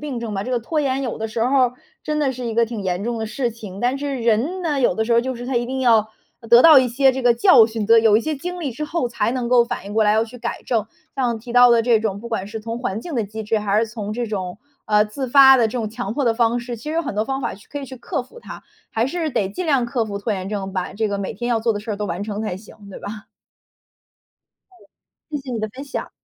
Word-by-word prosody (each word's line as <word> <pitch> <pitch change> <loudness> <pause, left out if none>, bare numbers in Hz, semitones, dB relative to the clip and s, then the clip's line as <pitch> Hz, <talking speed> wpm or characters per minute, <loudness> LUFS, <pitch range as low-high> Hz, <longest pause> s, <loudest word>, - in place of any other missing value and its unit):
病 280 -5 -4
症 225 -3 -5
吧， 195 - -2
这 255 - -5
个 245 - +1
拖 305 +7 -2
延 270 -1 0
有 245 -4 -4
的 220 - -3
时 225 +1 -1
候 270 +2 +2
儿 - - -16 0.3
真 300 0 -2
的 275 -3 +1
是 250 0 -7
一 225 - -3
个 235 0 +3
挺 225 -3 -5
严 185 +1 -2
重 235 0 -2
的 220 - -3
事 240 +2 -2
情。 210 -4 -10
但 250 +3 +1
是 280 -1 -3
人 235 +11 +1
呢， 295 -5 0
有 240 - +3
的 220 - 0
时 235 - 0
候 230 - +5
就 260 +1 -3
是 245 +1 -7
他 265 - -3
一 240 - +1
定 265 +1 -3
要 225 -4 +4 0.3
呃 230 - -13
得 235 +1 +8
到 315 -4 +9
一 255 -1 +2
些 265 +2 +3
这 265 0 -4
个 240 -1 +5
教 230 -1 +6
训 220 -2 -4
的 230 0 +6
有 220 -2 +5
一 225 - +2
些 310 +4 -2
经 355 +5 -6
历 280 -6 -3
之 300 +6 -4
后 300 -6 -2
才 235 - -1
能 245 -2 -2
够 245 -1 +5
反 200 - -5
应 205 - -7
过 220 - +3
来， 210 - +4
要 220 +1 +2
去 240 +2 -12
改 235 0 -5
正。 225 -3 0 0.3
像 245 -4 0
提 235 +2 -9
到 245 0 +7
的 230 -1 +4
这 230 -2 +4
种 205 -2 -2
不 235 - -8
管 220 -4 -3
是 220 +1 -6
从 230 +2 -5
环 220 -4 -3
境 330 +4 -7
的 230 -4 0
机 220 +2 -7
制， 215 +1 0
还 205 0 +1
是 225 - 0
从 215 -2 -5
这 240 +1 -2
种， 190 -2 -4 0.3
呃， 210 0 +4
自 240 +6 -5
发 265 +1 +8
的 235 - +3
这 220 - -7
种 225 -3 -2
强 220 -2 -4
迫 280 0 0
的 230 - +3
方 235 0 +1
式， 240 0 -6
其 225 - -14
实 300 - -4
有 335 - 0
很 285 - -4
多 215 +2 0
方 270 +1 -3
法 - - -3
去 205 - -17
可 290 - -5
以 - - -6
去 260 -1 -10
克 240 +1 -3
服 465 - -15
它， - - -10 0.3
还 225 - 0
是 330 +2 -2
得 195 -6 0
尽 350 - -5
量 275 -6 +2
克 240 -1 -1
服 205 -2 -5
拖 210 +2 -2
延 190 -1 -4
症， 195 -2 -4
把 185 -1 -3
这 215 +1 -1
个 200 0 -2
每 195 - -3
天 240 +4 -4
要 235 -2 +2
做 225 0 +1
的 205 - -4
事 220 - -7
儿 205 - -2
都 210 0 -3
完 175 +2 -4
成 210 0 -4
才 215 -5 -3
行， 210 +2 -14
对 - - -9
吧？ 210 +1 -8 1.5
嗯。 365 - -21 0.5
谢 295 - -2
谢 265 -2 -8
你 230 - -2
的 215 - -2
分 265 +6 -9
享。 280 - -5
235 Hz, 330 characters per minute, -21 LUFS, 215-260 Hz, 1.5 s, 到